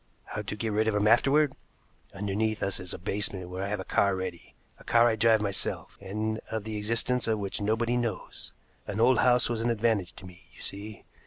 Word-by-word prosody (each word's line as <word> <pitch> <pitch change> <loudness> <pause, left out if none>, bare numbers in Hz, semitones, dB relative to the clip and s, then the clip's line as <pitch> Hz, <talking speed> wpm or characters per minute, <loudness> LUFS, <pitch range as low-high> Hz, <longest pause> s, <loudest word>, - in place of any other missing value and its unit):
How 105 - -5
to 105 0 -5
get 110 +1 -2
rid 110 +1 +1
of 110 - +1
him 105 +1 +2
afterward? 140 +5 +4 0.6
Underneath 105 +2 -1
us 100 - -1
is 90 -1 -6
a - - -3
basement 95 -1 -2
where 90 +1 -5
I - - -2
have 105 0 -2
a - - -4
car 100 -1 +2
ready, 95 -2 -6 0.2
a - - -14
car 120 0 +5
I 115 - +2
drive 110 0 +4
myself, 100 -2 -2
and 110 +3 -2
of 110 -2 -3
the 110 0 -5
existence 115 +4 0
of 110 -1 +2
which 100 0 -3
nobody 115 +3 +1
knows. 115 -5 -4 0.4
An 100 +1 -3
old 120 +2 +5
house 125 -1 +4
was 115 -2 -2
an 120 - +1
advantage 110 -5 +1
to 95 - -12
me, 90 0 -14
you - - -13
see. 105 +1 -5
105 Hz, 220 wpm, -28 LUFS, 100-115 Hz, 0.6 s, car